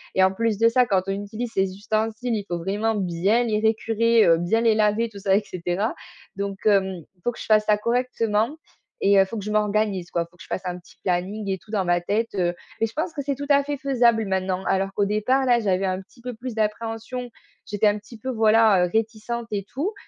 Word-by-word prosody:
et 190 - +5
en 190 - +1
plus 225 +1 0
de 230 +2 +4
ça, 250 +2 +4
quand 195 -5 +1
on 195 - 0
utilise 215 +4 -5
ses 190 -1 0
ustensiles, 220 +3 -2
il 210 - -2
faut 175 -3 -3
vraiment 205 +6 -1
bien 195 +5 +1
les 215 -2 0
récurer, 225 +1 +3
heu, 165 -1 +6
bien 175 +7 +1
les 225 -2 +4
laver, 215 +2 +2
tout 210 -3 -11
ça, 195 0 +2
et 210 - -1
cetera, 180 +4 -2 0.4
donc, 200 0 -3
hem, 190 -4 +2
il 180 - -34
faut 240 - +1
que 240 - -13
je - - -6
fasse 215 -1 +4
ça 210 -1 +3
correctement, 235 +2 0 0.4
et 200 0 +4
heu, - - +8
il - - +3
faut 225 - -6
que 200 - -5
je 210 - -3
m'organise, 210 -3 0
quoi. 170 -1 0
Faut 175 - -25
que - - -16
je - - -15
fasse 190 - -3
un 180 -1 -3
petit 175 - -20
planning 190 +3 -1
et 190 -1 -1
tout 215 - -17
dans 200 -4 0
ma 175 0 +2
tête, 215 +5 -1
heu, 175 -2 +1 0.3
et - - +4
je - - -11
pense 320 +3 -2
que 290 - -3
c'est 280 0 -1
tout 285 +2 -6
à 280 -1 +5
fait 290 0 -3
faisable 240 -5 +2
maintenant, 190 -1 -1
alors 195 0 0
qu'au 205 - +1
départ, 215 +6 +1
là, 245 -2 +4
j'avais 195 -2 +1
un 185 0 -1
petit 210 +6 -22
peu 250 +1 -5
plus 240 +1 -7
d'appréhension. 225 +3 -3 0.4
J'étais 205 +1 0
un 205 0 +2
petit 225 +3 -13
peu, 260 +4 -6
voilà, 220 -4 +4
heu, - - -3
réticente 225 +1 -2
et 200 -2 -2
tout, 330 +11 -2
215 Hz, 250 wpm, -24 LUFS, 195-230 Hz, 0.4 s, heu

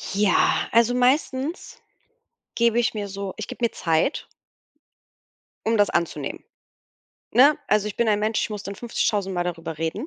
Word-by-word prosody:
Ja, 205 -2 +3 0.2
also, 230 +1 +4
meistens 265 +4 0 0.7
gebe 235 0 +3
ich 240 - +1
mir 205 -1 -3
so 195 -1 -6
ich 215 - -5
gebe - - -8
mir 230 - 0
Zeit 165 - 0 1.4
um 225 0 +2
das 205 -1 +3
anzunehmen, 170 - -2 0.9
ne? 280 +4 +6
Also, 210 0 +2
ich 210 - -5
bin 235 - +1
ein 210 -1 +3
Mensch, 215 +1 0
ich - - -3
muss 210 -1 -5
dann 200 - -6
50.000 205 -3 -1
Mal 175 0 -1
darüber 165 -3 -5
reden 165 - -3
210 Hz, 160 wpm, -23 LUFS, 195-235 Hz, 1.4 s, ne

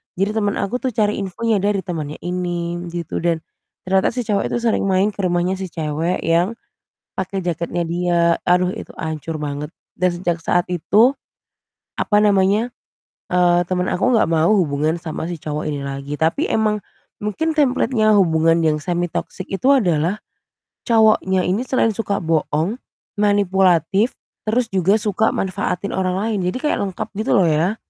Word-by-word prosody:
jadi 195 +3 0
temen 205 -2 +1
aku 235 +5 -1
tuh 255 -2 -2
cari 210 -1 +1
infonya 205 +3 -1
dari 200 0 0
temennya 155 -6 -5
ini 175 -1 -2 0.2
gitu 170 -2 -4
dan 165 -1 0 0.4
ternyata 190 +3 +2
si 250 - -1
cowok 210 -3 0
itu - - -1
sering 230 -3 +1
main 190 +2 +3
ke 210 - -12
rumahnya 175 +1 0
si 190 - -4
cewek 165 +1 -2
yang 170 +7 +2 0.6
pakai 190 0 -3
jaketnya 170 0 -2
dia, 175 +1 0 0.3
aduh, 180 0 +3
itu - - -9
hancur 160 0 -4
banget 145 +2 -4 0.2
dan 180 0 +2
sejak 175 -1 -1
saat 175 +2 0
itu, 200 - +3 0.9
apa 205 - +2
namanya, 205 +4 +2 0.6
eee, 175 -1 +3
temen 180 0 -1
aku 195 - +1
nggak 220 - +3
mau 160 0 +3
hubungan 155 -3 +1
sama 165 -1 -5
si 175 - -4
cowok 150 0 -4
ini 145 -2 -3
lagi, 140 +1 -5
tapi 160 - 0
emang 215 -1 +1 0.4
mungkin 255 +11 -1
template-nya 255 -7 +2
hubungan 165 -3 +3
yang 155 -1 +2
semi 175 +2 -2
toxic 185 - -5
itu 200 +7 -1
adalah 180 - +1 0.7
cowoknya 215 -5 +3
ini 200 +8 0
selain 255 -3 +2
suka 200 -2 -2
bohong, 160 +4 0 0.4
manipulatif 195 - +2 0.3
terus 230 +2 0
juga 190 +1 +3
suka 210 +1 +1
manfaatin 190 0 -2
orang 185 -1 -1
lain. 210 +2 -1
Jadi 180 - -2
kayak 300 - +1
lengkap 190 -3 -4
gitu 220 - +1
loh 195 - +5
ya. 160 +7 +1
185 Hz, 160 wpm, -20 LUFS, 165-210 Hz, 0.9 s, loh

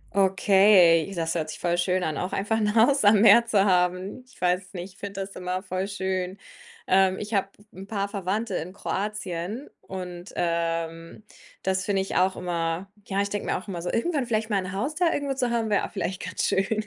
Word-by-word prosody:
Okay, 190 -3 +5
das 165 -1 -1
hört 155 -2 -2
sich - - -6
voll 175 0 0
schön 180 +1 +1
an, 155 -2 -2
auch 180 - -3
einfach 210 +3 0
'n 210 0 0
Haus 245 +3 +4
am 205 0 +6
Meer 235 +1 +7
zu 205 -3 +3
haben. 185 +5 +1
Ich 255 - -20
weiß 180 +1 0
nicht, 180 +1 -7
ich - - -23
finde 200 -1 -5
das 195 0 -7
immer 185 +1 -3
voll 185 +1 -3
schön. 190 -1 -3 0.5
Ähm, 190 0 +3
ich 210 +2 -6
habe 195 -1 +2 0.3
'n 195 +2 -10
paar 200 -2 -2
Verwandte 200 +2 -2
in 180 +4 -4
Kroatien 205 - -4
und, 180 -1 -7
ähm, 165 +1 -2 0.4
das 190 0 0
finde 195 -2 0
ich 195 - -6
auch 190 +1 +3
immer 175 +1 -3 0.2
ja, 195 0 0
ich 200 - -4
denke 205 - -3
mir - - +1
auch 185 - -10
immer 175 -3 -5
so: 175 - -3
irgendwann 275 0 0
vielleicht 220 -1 -1
mal 200 - +2
'n 185 - -6
Haus 265 +10 -2
da 335 +1 +2
irgendwo 285 -1 -1
zu 255 -2 -1
haben, 225 -2 -1
wäre 200 - +2
auch - - -18
vielleicht 190 -2 -3
ganz 185 - -3
schön. 210 +3 0
190 Hz, 215 wpm, -26 LUFS, 180-210 Hz, 0.5 s, Meer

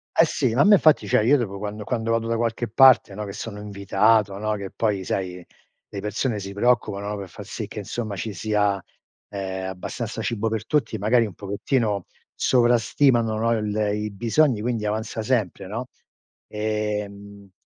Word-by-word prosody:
Eh 165 - +6
sì, 130 -6 0
ma 125 - +2
a - - +7
me 205 +1 +7
infatti 155 - +4
cioè 105 - +3
io 135 +6 +4
dopo 105 -5 -3
quando 105 +1 -5
quando 115 0 -2
vado 115 0 +1
da 115 0 0
qualche 115 +1 -1
parte, 120 -3 +6
no, 105 +1 -5
che 100 - -6
sono 105 0 -7
invitato, 100 +1 +2
no, 110 +2 -2
che 100 -2 -6
poi 105 -4 -1
sai 90 -1 -3 0.5
le 100 - -6
persone 105 +3 -2
si 100 0 -6
preoccupano, 105 -2 +1
no, 105 - -3
per 100 -2 -7
far - - -10
sì - - -5
che - - -9
insomma 110 -4 -4
ci 105 +2 -4
sia 105 0 0 0.5
ehm 95 -2 -4
abbastanza 110 +5 -5
cibo 110 -1 -1
per 110 0 -3
tutti, 145 -7 0
magari 115 +4 +3
un 105 - -5
pochettino 100 - -1 0.3
sovrastimano, 120 -1 +3
no, 115 +1 +1
il 105 -1 -2 0.2
i 105 0 -3
bisogni 115 +4 +2
quindi 115 -1 -2
avanza 110 +1 -2
sempre, 110 -5 -1
no, 115 +6 -5 0.6
e 105 -1 -2
mhmm 100 -1 -13
105 Hz, 185 wpm, -24 LUFS, 100-115 Hz, 0.6 s, a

